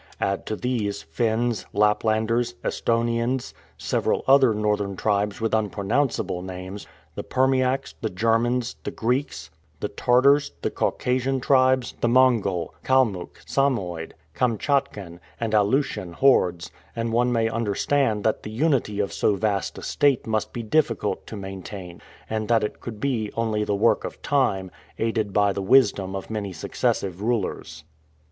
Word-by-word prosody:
Add 100 0 -1
to 110 - -2
these, 110 -4 -2
Finns, 115 +7 -1
Laplanders, 110 +3 +1
Esthonians, 115 +2 0 0.2
several - - 0
other 135 -2 +6
northern 105 -2 -1
tribes 105 +1 0
with 115 0 -1
unpronounceable 110 -1 0
names, 95 +2 -7 0.3
the - - -5
Permiaks, 130 0 +1
the 110 - -1
Germans, 115 +5 0
the - - -3
Greeks, 125 - -2 0.3
the - - -3
Tartars, 140 +4 +3
the - - 0
Caucasian 130 +1 0
tribes, 130 -1 +3
the - - +2
Mongol, 115 -8 +2
Kalmuck, 115 -9 +1
Samoid, 95 -12 -1 0.2
Kamtschatkan, 115 - -1 0.2
and 115 -2 -2
Aleutian 105 -4 +1
hordes, 90 - +2 0.2
and 115 0 -2
one 120 +1 +2
may 115 -1 +2
understand 115 +1 0
that 110 - +1
the - - -7
unity 120 -4 0
of 100 - -1
so 105 - +2
vast 100 -1 -1
a - - -8
state 140 -3 +2
must 110 -1 -1
be 120 - -5
difficult 115 -4 0
to - - -7
maintain, 95 -2 -8 0.3
and 110 -1 -2
that 115 -2 +3
it 105 - -4
could 110 +1 -6 0.3
only 110 -2 0
be - - +1
the 105 - 0
work 110 +4 +2
of - - -6
time, 95 -10 +1 0.3
aided 110 -2 -1
by 100 0 +2
the 100 - -3
wisdom 100 -4 +3
of 95 +3 -6
many 105 -3 -3
successive 90 +2 -2
rulers. 100 -9 -2
110 Hz, 140 wpm, -24 LUFS, 100-125 Hz, 0.3 s, other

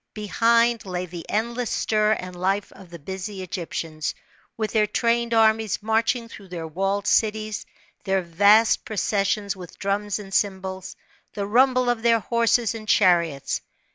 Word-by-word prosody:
Behind, 230 +2 +2
lay 180 -2 -4
the 170 -1 -9
endless 235 +3 -1
stir 215 0 +1
and 180 -3 -6
life 195 +3 -1
of 190 -2 -15
the 170 - -9
busy 190 +4 -6
Egyptians, 165 -3 -4 0.4
with 215 -2 -2
their 215 -2 +2
trained 235 +2 0
armies 220 -2 +2
marching 225 +2 +1
through 200 -3 -12
their 175 -3 -6
walled 195 +5 -2
cities, 215 -1 0 0.4
their 190 -2 0
vast 205 +6 +4
processions 200 -1 -1
with 180 -3 -11
drums 205 +1 -1
and 195 -2 -10
cymbals, 190 -2 -2 0.4
the 200 - -2
rumble 255 +3 +3
of 240 -2 +1
their 230 0 +4
horses 235 +1 +1
and 220 -1 -8
chariots. 170 -9 +2
205 Hz, 145 wpm, -24 LUFS, 190-225 Hz, 0.4 s, vast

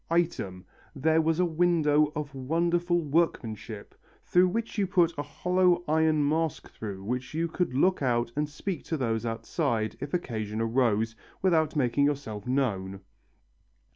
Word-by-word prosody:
Item, 130 - -1 0.3
there 160 +3 +3
was 160 +1 +1
a 180 - +4
window 155 -3 +3
of 150 -2 -4
wonderful 170 +6 +1
workmanship, 115 -9 -2 0.3
through 180 +1 +4
which 225 +3 -3
you 195 - +2
put 175 -3 +3
a 145 - -2
hollow 180 +4 +1
iron 155 -1 +3
mask 160 0 -1
through 100 -3 -7
which 125 +7 -4
you 165 +1 0
could 165 -5 -2
look 185 +6 +3
out 120 -3 +1
and 150 0 -1
speak 160 +2 -4
to 160 - -2
those 115 -3 -1
outside, 115 -1 -1
if 140 +1 -5
occasion 110 -9 -3
arose, 115 -1 +1 0.3
without 160 -5 +2
making 140 0 +2
yourself 130 -8 -3
known. 100 -8 -1
145 Hz, 145 wpm, -28 LUFS, 115-170 Hz, 0.3 s, a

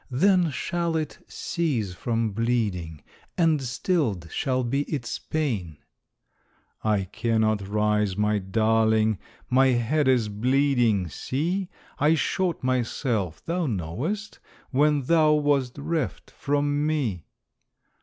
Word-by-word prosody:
Then 180 +6 +3
shall 170 +3 -2
it 155 -1 -3
cease 135 - -2
from 115 +3 -1
bleeding. 100 -8 -1 0.3
And 160 -4 +3
stilled 125 - -1
shall 130 -3 0
be 135 +4 0
its 135 -6 -4
pain." 110 - -2 1.1
"I 105 -3 +2
cannot 110 0 0
rise, 105 -1 +1
my 105 0 +2
darling, 110 +1 +2 0.3
My 130 +1 +4
head 130 +4 +1
is 125 -4 +3
bleeding 120 -2 +2
see! 175 - -2 0.3
I 155 +2 +4
shot 170 +4 -1
myself, 120 - -1
thou 170 -1 -1
knowest, 125 - -3 0.3
When 145 +1 +3
thou 155 +2 +4
wast 145 -4 +1
reft 155 +2 -3
from 145 +1 0
me." 125 - -1
125 Hz, 110 wpm, -25 LUFS, 105-150 Hz, 1.1 s, My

